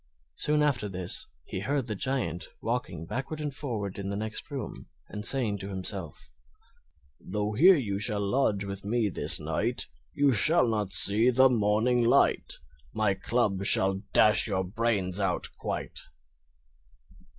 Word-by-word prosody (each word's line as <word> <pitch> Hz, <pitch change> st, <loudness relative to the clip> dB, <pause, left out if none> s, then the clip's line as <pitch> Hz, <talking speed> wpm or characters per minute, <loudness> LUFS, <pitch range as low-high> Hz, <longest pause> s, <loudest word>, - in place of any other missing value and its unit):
Soon 150 Hz, -, 0 dB
after 125 Hz, -8 st, 0 dB
this 90 Hz, -2 st, -4 dB, 0.2 s
he -, -, -5 dB
heard 135 Hz, +6 st, -2 dB
the 110 Hz, -, -4 dB
Giant 105 Hz, -7 st, -3 dB
walking 110 Hz, -9 st, -4 dB
backward 135 Hz, -, -5 dB
and 150 Hz, -2 st, -4 dB
forward 110 Hz, -9 st, -5 dB
in 100 Hz, 0 st, -5 dB
the 100 Hz, -, -3 dB
next 110 Hz, +4 st, -4 dB
room 140 Hz, -3 st, -7 dB, 0.2 s
and 105 Hz, 0 st, -7 dB
saying 110 Hz, -5 st, +1 dB
to 100 Hz, -, -6 dB
himself: 95 Hz, -6 st, -6 dB, 0.9 s
"Though 105 Hz, +2 st, -4 dB
here 180 Hz, -, +6 dB
you 100 Hz, -, -3 dB
shall 105 Hz, -1 st, 0 dB
lodge 105 Hz, -4 st, 0 dB
with 100 Hz, 0 st, -7 dB
me 110 Hz, +1 st, 0 dB
this -, -, +4 dB
night, -, -, -1 dB, 0.3 s
You 145 Hz, -1 st, +3 dB
shall 130 Hz, -, +3 dB
not 105 Hz, -4 st, -2 dB
see 110 Hz, +6 st, +7 dB
the 130 Hz, +1 st, +5 dB
morning 115 Hz, +2 st, +1 dB
light; 115 Hz, -, +2 dB, 0.4 s
My 110 Hz, -2 st, +1 dB
club 100 Hz, -2 st, -1 dB
shall 95 Hz, 0 st, +2 dB
dash 105 Hz, +2 st, +4 dB
your 95 Hz, -3 st, -1 dB
brains 100 Hz, -2 st, -1 dB
out 100 Hz, -, -1 dB
quite!" -, -, -5 dB
105 Hz, 150 wpm, -27 LUFS, 100-125 Hz, 0.9 s, see